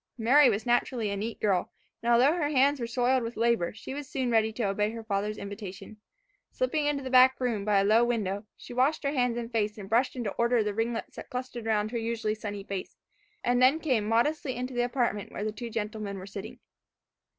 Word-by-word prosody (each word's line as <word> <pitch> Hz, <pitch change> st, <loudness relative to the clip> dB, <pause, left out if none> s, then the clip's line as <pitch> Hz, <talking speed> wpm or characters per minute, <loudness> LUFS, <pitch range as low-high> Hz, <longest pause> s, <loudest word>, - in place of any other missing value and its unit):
Mary 255 Hz, +4 st, +6 dB
was 215 Hz, -1 st, -1 dB
naturally 240 Hz, -2 st, +1 dB
a -, -, -1 dB
neat 215 Hz, +3 st, -4 dB
girl, 195 Hz, -4 st, +1 dB, 0.3 s
and 235 Hz, -, +1 dB
although 250 Hz, +6 st, +5 dB
her 325 Hz, -4 st, 0 dB
hands 280 Hz, 0 st, +3 dB
were 235 Hz, -, -2 dB
soiled 250 Hz, +2 st, +2 dB
with 230 Hz, 0 st, -5 dB
labour, 230 Hz, -6 st, +2 dB
she 220 Hz, +5 st, -8 dB
was 285 Hz, -1 st, -6 dB
soon 260 Hz, -4 st, -1 dB
ready 220 Hz, -1 st, +3 dB
to 225 Hz, +2 st, -4 dB
obey 210 Hz, +1 st, +1 dB
her 225 Hz, 0 st, -7 dB
father's 210 Hz, 0 st, -2 dB
invitation. 200 Hz, 0 st, -8 dB, 0.5 s
Slipping 315 Hz, -12 st, -1 dB
into 285 Hz, -2 st, -1 dB
the 260 Hz, -, -5 dB
back 260 Hz, 0 st, +6 dB
room, 235 Hz, -5 st, -1 dB
by 205 Hz, -2 st, +3 dB
a -, -, +3 dB
low 220 Hz, +4 st, +5 dB
window, 210 Hz, -4 st, -1 dB
she -, -, -10 dB
washed 270 Hz, +6 st, +1 dB
her 280 Hz, -, 0 dB
hands 245 Hz, -4 st, +1 dB
and 235 Hz, 0 st, -5 dB
face, 215 Hz, -2 st, -1 dB
and 200 Hz, -2 st, -8 dB
brushed 240 Hz, +6 st, +2 dB
into 240 Hz, -4 st, -3 dB
order 235 Hz, -1 st, +3 dB
the 210 Hz, -1 st, -2 dB
ringlets 225 Hz, +2 st, -3 dB
that -, -, -8 dB
clustered 250 Hz, -2 st, -5 dB
around 215 Hz, -1 st, +1 dB
her 235 Hz, -, -2 dB
usually 225 Hz, -1 st, -1 dB
sunny 205 Hz, -2 st, -6 dB
face, 195 Hz, -2 st, -6 dB, 0.5 s
and 245 Hz, +1 st, +2 dB
then 265 Hz, +5 st, +5 dB
came 255 Hz, -10 st, 0 dB
modestly 260 Hz, +4 st, +1 dB
into 250 Hz, +1 st, -4 dB
the 245 Hz, -, 0 dB
apartment 240 Hz, -5 st, -1 dB
where -, -, -5 dB
the 215 Hz, -, -1 dB
two 230 Hz, +3 st, -7 dB
gentlemen 210 Hz, -2 st, -4 dB
were 185 Hz, -, -8 dB
sitting. 200 Hz, 0 st, -8 dB
230 Hz, 220 wpm, -28 LUFS, 210-255 Hz, 0.5 s, Mary